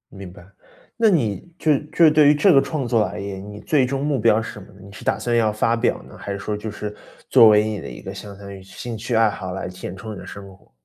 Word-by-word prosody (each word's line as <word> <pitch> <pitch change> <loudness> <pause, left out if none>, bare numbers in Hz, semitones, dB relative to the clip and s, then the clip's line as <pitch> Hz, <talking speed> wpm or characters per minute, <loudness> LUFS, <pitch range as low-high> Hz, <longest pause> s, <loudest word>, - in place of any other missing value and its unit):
明 95 -2 -9
白， 85 -2 -15 0.5
那 225 -2 +4
你 140 - 0
就 150 -3 +2 0.2
就 165 -2 +6
对 150 -1 +5
于 150 - +6
这 175 +6 +4
个 135 - +6
创 140 -6 -3
作 115 -2 +2
而 - - -5
言， 100 -1 -6
你 105 - -9
最 150 -6 +2
终 135 +2 -2
目 145 -3 0
标 110 0 +3
是 115 - -6
什 105 - -10
么 95 - -12
呢？ 100 - -18
你 100 - -13
是 105 - -11
打 - - +1
算 120 -1 -1
要 110 -2 +3
发 115 +2 +1
表 120 +1 -1
呢？ - - -14
还 100 - -6
是 100 - -5
说 105 +1 -3
就 105 +1 -6
是 105 0 -6 0.4
作 115 - +8
为 105 0 +5
你 110 -2 -3
的 - - -8
一 - - -10
个 - - -7
相 100 -1 -10
当 100 0 -10
于 95 - -10
兴 115 +4 -8
趣 115 +2 -3
爱 110 -1 +4
好 95 -3 -6
来 95 - -4
填 90 0 -8
充 110 +3 -8
你 100 - -9
的 - - -10
生 100 -1 -9
活？ 95 - -27
110 Hz, 310 characters per minute, -22 LUFS, 100-125 Hz, 0.5 s, 作